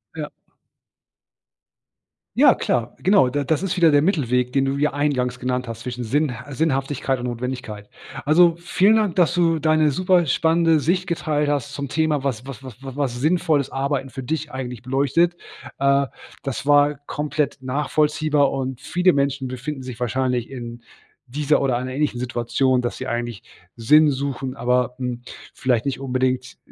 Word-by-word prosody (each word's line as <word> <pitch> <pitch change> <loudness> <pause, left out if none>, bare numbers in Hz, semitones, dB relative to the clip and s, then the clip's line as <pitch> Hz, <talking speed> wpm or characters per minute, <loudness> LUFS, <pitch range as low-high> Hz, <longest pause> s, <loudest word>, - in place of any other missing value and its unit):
Ja. - - -5 2.0
Ja, - - +6
klar. 120 0 -1
Genau, 190 -6 +4
da 145 +3 -1
das 150 +4 0
ist 195 -2 -1
wieder 170 -3 +5
der 145 0 +5
Mittelweg, 125 - +1
den 135 - +2
du 135 +1 -1
hier 150 0 +1
eingangs 130 -4 0
genannt 125 0 -2
hast 115 -1 -7
zwischen 125 0 -5
Sinnh 145 +4 0 0.2
Sinnhaftigkeit 135 -2 -1
und 125 - -5
Notwendigkeit. 120 -4 -5 0.3
Also 165 +3 +5
vielen 180 +5 +3
Dank, 210 -5 +1
dass 175 -2 +4
du 165 -2 +2
deine 155 -1 +3
super 180 +2 +2
spannende 165 +2 +3
Sicht 180 +5 0
geteilt 150 -3 0
hast 140 -1 -2
zum 140 -1 -5
Thema, 155 -1 0
was 125 -3 -2
was 135 0 -9
was 130 -2 -11
was 135 -1 -8
was 135 -4 -2
sinnvolles 155 -1 +1
Arbeiten 135 0 -2
für 130 +1 -7
dich 155 +3 -3
eigentlich 125 -4 -6
beleuchtet. 140 +7 +1 0.4
Äh, 140 0 +2 0.3
das 135 -1 -4
war 145 0 +4
komplett 150 0 -2
nachvollziehbar. 150 +2 +1
Und 130 -2 -3
viele 180 +1 +2
Menschen 140 -3 -1
befinden 130 +2 -5
sich 125 -2 -8
wahrscheinlich 125 0 -1
in 120 -2 -8 0.4
dieser 150 +4 +1
oder 135 -3 +1
einer 130 +1 -4
ähnlichen 140 -2 -1
Situation, 125 +1 0
dass 120 - -3
sie 130 - -6
eigentlich 120 -3 -4 0.3
Sinn 150 +7 +5
suchen, 135 -1 -3
aber, 125 0 +1
hm, 125 -2 -4 0.3
vielleicht 125 -3 0
nicht 135 -1 -2
unbedingt 130 -1 -1
135 Hz, 160 wpm, -22 LUFS, 125-150 Hz, 2.0 s, Ja